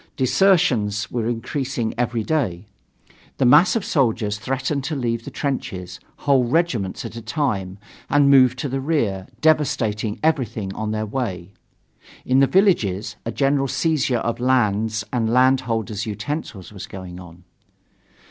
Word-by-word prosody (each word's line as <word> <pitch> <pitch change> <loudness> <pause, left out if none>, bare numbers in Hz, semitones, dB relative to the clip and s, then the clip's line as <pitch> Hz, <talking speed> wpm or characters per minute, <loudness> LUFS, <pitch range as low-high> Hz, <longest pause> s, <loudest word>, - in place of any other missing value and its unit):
Desertions 130 - +2
were 115 -2 -1
increasing 120 0 -3
every 120 -1 -1
day; 110 - -1 0.7
the 130 - +2
masses 150 - +6
of 225 - -1
soldiers 110 -7 0
threatened 135 +3 -2
to 155 +3 -3
leave 115 -3 -2
the - - -5
trenches, 95 -10 -4 0.3
whole 135 -3 +4
regiments 120 - -1
at - - -7
a 115 - -6
time, 105 -7 -2 0.3
and 145 -1 +4
move 130 -2 +6
to 135 - -3
the 135 0 -3
rear, 115 - -1
devastating 115 -9 +1
everything 115 -10 0
on 110 +1 -4
their 110 0 -2
way. 100 -7 -4 0.7
In 130 +1 +3
the 135 - +5
villages, 105 - +2
a - - -1
general 135 +1 +1
seizure 140 -3 +1
of 115 +1 -2
lands 110 -4 +1
and 115 -2 0
landholders' 120 -5 +1
utensils 105 - -5
was 100 - -8
going 90 -2 -9
on. 90 -1 -13
120 Hz, 140 wpm, -22 LUFS, 105-135 Hz, 0.7 s, masses